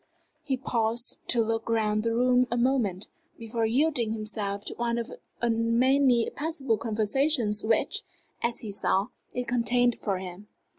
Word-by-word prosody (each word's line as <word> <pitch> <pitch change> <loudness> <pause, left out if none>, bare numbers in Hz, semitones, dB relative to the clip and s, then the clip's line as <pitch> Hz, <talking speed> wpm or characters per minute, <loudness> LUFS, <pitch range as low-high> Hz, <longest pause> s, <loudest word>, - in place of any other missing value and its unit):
He 275 -3 -1
paused 235 -1 -1
to 235 -1 +3
look 225 0 -2
round 215 -2 +1
the 230 +1 0
room 250 +1 +3
a 240 - -1
moment, 235 -7 +1 0.3
before 225 -1 -1
yielding 245 -2 +1
himself 210 -2 -4
to - - -2
one 235 0 -1
of 235 +2 -4 0.3
the 235 - +2
many 240 +2 +3
possible 280 -7 -1
conversations 225 +1 +1
which, 250 - +1 0.4
as 235 0 -1
he 215 - -5
saw, 195 0 0 0.2
it 250 -1 -3
contained 245 0 +2
for 195 -3 0
him. 185 +2 -8
230 Hz, 150 wpm, -28 LUFS, 215-250 Hz, 0.4 s, to